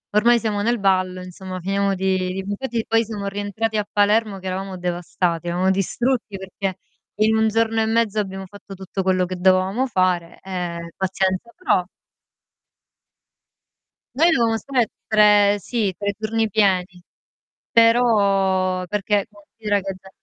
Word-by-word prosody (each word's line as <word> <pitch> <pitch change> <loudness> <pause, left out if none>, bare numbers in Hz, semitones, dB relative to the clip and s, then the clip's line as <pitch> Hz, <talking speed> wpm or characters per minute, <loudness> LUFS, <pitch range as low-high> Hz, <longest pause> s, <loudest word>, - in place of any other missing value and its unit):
ormai 235 +3 +5
siamo 215 -2 -1
nel 235 +3 +1
ballo 185 -2 +1
insomma 185 0 -8
finiamo 195 +2 0
di" 185 0 -1
Infatti 225 +2 -3
poi 225 0 +3
siamo 210 -2 -6
rientrati 205 +2 -2
a 210 - -1
Palermo 210 0 +2
che 190 - -14
eravamo 190 0 -4
devastati, 175 -1 -2
eravamo 180 +2 +1
distrutti 215 +3 -1
perché 190 0 -5 0.4
in 215 +1 +2
1 220 0 +3
giorno 225 0 +1
e - - +2
mezzo 220 -2 +1
abbiamo 195 -1 -4
fatto 200 +1 -12
tutto 190 +1 -5
quello 185 -1 +1
che 185 +1 -5
dovevamo 190 +7 +2
fare, 185 -6 0
e 175 -3 -5
pazienza. 190 +3 -1
Però 340 - +1 2.3
Noi 330 +3 +5
dovevamo 230 -6 +2
stare 245 +1 0 0.2
tre 210 -1 +5
sì, 210 -1 -2
3 205 -1 -2
giorni 220 +1 -1
pieni, 185 -4 +1 0.7
però 195 -6 +3
perché 205 +1 0
considera 205 0 -3
che 195 0 -4
da 190 - -16
200 Hz, 140 wpm, -21 LUFS, 185-220 Hz, 2.3 s, ormai